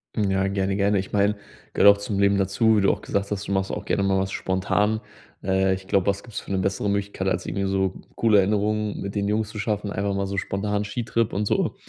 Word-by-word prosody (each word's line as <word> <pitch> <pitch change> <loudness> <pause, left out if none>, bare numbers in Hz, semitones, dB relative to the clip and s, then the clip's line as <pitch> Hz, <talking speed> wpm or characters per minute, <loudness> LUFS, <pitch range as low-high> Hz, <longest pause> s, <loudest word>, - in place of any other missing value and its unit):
Mhm, 105 -3 +1
ja, 95 0 +1
gerne, 95 0 -1
gerne. 100 0 +2
Ich 95 - -5
meine, 105 0 +2 0.4
gehört 100 0 +7
auch - - -14
zum 100 -1 -2
Leben 100 0 +4
dazu, 100 +3 +2
wie 105 - +3
du 100 - +4
auch - - -4
gesagt 100 +1 -2
hast, 100 0 -3
du - - -4
machst 95 -1 0
auch - - -5
gerne 100 - 0
mal 95 -1 +2
was 95 0 -2
spontan. 105 +3 0 0.4
Äh, 95 0 +2
ich 95 0 -6
glaube, 95 -2 +2
was 100 0 0
gibt's 115 -4 -6
für - - -9
'ne 95 - +1
bessere 100 +2 -1
Möglichkeit, 100 -1 -2
als 95 - -1
irgendwie 100 -1 -2
so 95 -1 0 0.2
coole 110 -3 +4
Erinnerungen 105 +1 +1
mit 100 +1 -5
den 100 -1 0
Jungs 105 +1 0
zu 105 - -9
schaffen, 105 -1 -2
einfach 100 0 -1
mal 100 0 -1
so 100 0 -4
spontan 105 +2 -1
Skitrip 115 +1 -1
und 105 +2 0
so. - - 0
100 Hz, 245 wpm, -24 LUFS, 95-105 Hz, 0.4 s, gehört